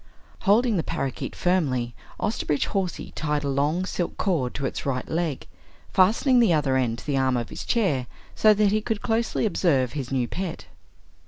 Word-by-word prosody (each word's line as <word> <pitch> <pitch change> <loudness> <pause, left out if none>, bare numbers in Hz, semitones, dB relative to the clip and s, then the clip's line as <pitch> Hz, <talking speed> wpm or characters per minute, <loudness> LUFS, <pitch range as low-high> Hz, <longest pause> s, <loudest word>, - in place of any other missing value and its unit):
Holding 220 +2 +3
the - - +2
parakeet 135 -2 -3
firmly, 135 -10 0 0.3
Osterbridge 150 -9 0
Hawsey 190 -4 -2
tied 150 -1 -2
a - - -1
long 145 +6 +1
silk 175 -2 -3
cord 155 -11 0
to 140 - -2
its - - -3
right 130 -2 -2
leg, 160 -4 -2 0.5
fastening 230 +7 +4
the 225 -8 +5
other 145 -4 +2
end 120 -3 +1
to - - -11
the 145 -2 0
arm 130 -1 +2
of 120 - -3
his - - -6
chair 155 - +1 0.3
so 215 - +5
that 205 -1 +3
he 215 +1 +1
could 220 -1 -3
closely 225 0 0
observe 140 - +1
his 140 -4 -4
new 125 -3 0
pet. 180 +4 -5
155 Hz, 180 wpm, -25 LUFS, 135-200 Hz, 0.5 s, the